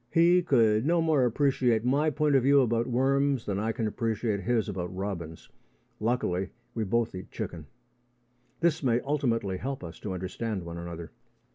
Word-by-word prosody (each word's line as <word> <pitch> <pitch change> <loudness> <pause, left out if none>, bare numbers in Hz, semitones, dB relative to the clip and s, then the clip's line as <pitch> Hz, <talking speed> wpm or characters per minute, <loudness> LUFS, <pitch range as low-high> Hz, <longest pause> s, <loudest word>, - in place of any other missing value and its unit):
He 175 +2 +5
could 115 -9 +3
no 170 +4 +2
more 155 -5 +3
appreciate 125 -2 +2
my 145 +5 +3
point 150 0 +1
of 135 - +5
view 140 +2 +5
about 115 -1 +1
worms 135 +1 +1
than 100 -1 -2
I 110 +2 0
can 115 0 -2
appreciate 110 -1 -1
his 115 +1 0
about 90 -4 -4
robins. 90 -5 -5 0.5
Luckily, 105 -5 0 0.2
we 115 - -1
both 115 +3 0
eat 90 -1 -8
chicken. 80 -4 -6 0.9
This 165 -2 +2
may 120 -4 +2
ultimately 120 -9 -1
help 135 +3 -5
us 85 -1 -8
to 100 - -4
understand 95 +2 -4
one 85 0 -6
another. 85 -1 -7
115 Hz, 165 wpm, -28 LUFS, 95-135 Hz, 0.9 s, He